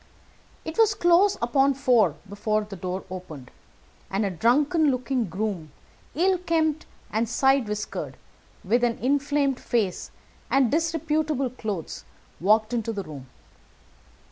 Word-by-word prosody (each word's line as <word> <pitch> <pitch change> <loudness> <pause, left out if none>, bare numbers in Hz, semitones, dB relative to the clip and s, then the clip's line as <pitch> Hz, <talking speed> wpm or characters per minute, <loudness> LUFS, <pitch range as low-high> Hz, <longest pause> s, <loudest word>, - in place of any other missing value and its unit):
It 320 +6 -5
was 440 -2 +5
close 360 +2 +4
upon 270 +3 +3
four 240 - +3
before 215 +2 -1
the 205 -1 -9
door 185 +1 -4
opened, 155 -9 -8 0.6
and 200 +2 0
a 195 - -1
drunken 290 - +3
looking 255 -1 0
groom, 185 -4 -4 0.4
ill 365 +3 +2
kempt 320 -3 0 0.2
and 220 +1 0
side 265 0 +3
whiskered, 210 0 -4 0.5
with 235 +6 +1
an 235 -1 +1
inflamed 280 0 +1
face 215 -7 -1 0.4
and 270 -4 +3
disreputable 310 -4 0
clothes, 210 -9 -5 0.4
walked 215 +5 +3
into 230 -1 -1
the 205 -3 -4
room. 140 -5 -10
240 Hz, 125 wpm, -25 LUFS, 205-295 Hz, 0.6 s, was